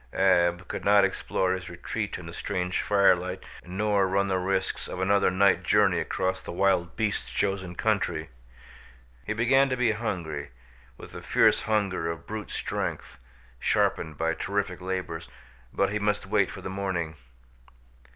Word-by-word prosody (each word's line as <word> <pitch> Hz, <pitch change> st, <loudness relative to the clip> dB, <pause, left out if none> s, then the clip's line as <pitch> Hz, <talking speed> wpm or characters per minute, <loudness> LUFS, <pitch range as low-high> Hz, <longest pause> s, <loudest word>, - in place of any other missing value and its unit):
Ab 85 Hz, -2 st, +3 dB
could -, -, -5 dB
not 100 Hz, 0 st, +6 dB
explore 95 Hz, -1 st, 0 dB
his 90 Hz, -3 st, -5 dB
retreat -, -, -4 dB
in -, -, -10 dB
the 85 Hz, -, -8 dB
strange 90 Hz, 0 st, -2 dB
firelight 95 Hz, -2 st, +2 dB, 0.2 s
nor 100 Hz, +2 st, +1 dB
run 100 Hz, +1 st, +1 dB
the 95 Hz, -1 st, 0 dB
risks 95 Hz, 0 st, -1 dB
of -, -, -6 dB
another 100 Hz, +1 st, +3 dB
night 95 Hz, +1 st, +3 dB
journey 100 Hz, -4 st, +3 dB
across 95 Hz, 0 st, -1 dB
the -, -, -7 dB
wild 85 Hz, -2 st, +1 dB
beasts' 110 Hz, -2 st, -1 dB
chosen 95 Hz, -3 st, -1 dB
country. 85 Hz, -7 st, 0 dB, 1.0 s
He 110 Hz, -, 0 dB
began 135 Hz, +5 st, +3 dB
to 130 Hz, -, -1 dB
be 120 Hz, -2 st, +3 dB
hungry, 85 Hz, -10 st, -4 dB, 0.5 s
with -, -, -11 dB
the -, -, -8 dB
fierce -, -, +3 dB
hunger 100 Hz, -6 st, 0 dB
of 85 Hz, 0 st, -6 dB
brute 110 Hz, -1 st, -6 dB
strength, 70 Hz, -, -4 dB, 0.4 s
sharpened 80 Hz, -2 st, 0 dB
by 80 Hz, +1 st, +1 dB
terrific 100 Hz, 0 st, -2 dB
labors, 90 Hz, -3 st, -4 dB, 0.4 s
but 100 Hz, 0 st, +1 dB
he 105 Hz, -, -1 dB
must 105 Hz, 0 st, 0 dB
wait 100 Hz, -1 st, +2 dB
for 95 Hz, -, -8 dB
the 95 Hz, -, -5 dB
morning. 95 Hz, -5 st, -2 dB
95 Hz, 155 wpm, -27 LUFS, 90-100 Hz, 1.0 s, not